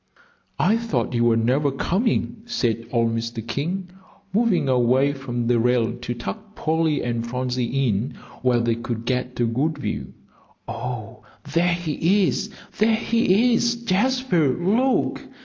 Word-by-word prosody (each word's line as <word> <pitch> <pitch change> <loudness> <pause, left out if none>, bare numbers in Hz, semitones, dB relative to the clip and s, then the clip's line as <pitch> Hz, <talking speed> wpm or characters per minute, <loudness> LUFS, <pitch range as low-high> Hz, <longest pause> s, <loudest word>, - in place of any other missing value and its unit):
"I 215 +5 +3
thought 230 - -1
you 120 0 +2
were 115 -1 +4
never 130 +6 +2
coming," 200 - 0
said 115 - -1
old 115 -1 +1
Mr. 115 0 -4
King, 175 +9 -3 0.4
moving 215 -8 +2
away 130 +2 +3
from 120 -3 -4
the 120 0 +3
rail 120 -1 +2
to 120 0 -5
tuck 210 - -7
Polly 160 -2 0
and 120 -1 -1
Phronsie 125 +2 -1
in 110 +4 -1 0.3
where 125 -2 +3
they 115 0 +1
could 115 0 -4
get 125 0 -2
a 120 - +3
good 140 +7 0
view. 70 - -4 0.5
"Oh, 120 -2 -5 0.3
there 170 +1 +3
he 175 +4 +1
is 205 - -2 0.3
there 220 +1 +4
he 230 +1 +3
is 240 +1 +2
Jasper, 235 - +1
look!" 225 +9 +1
135 Hz, 145 wpm, -23 LUFS, 120-195 Hz, 0.5 s, were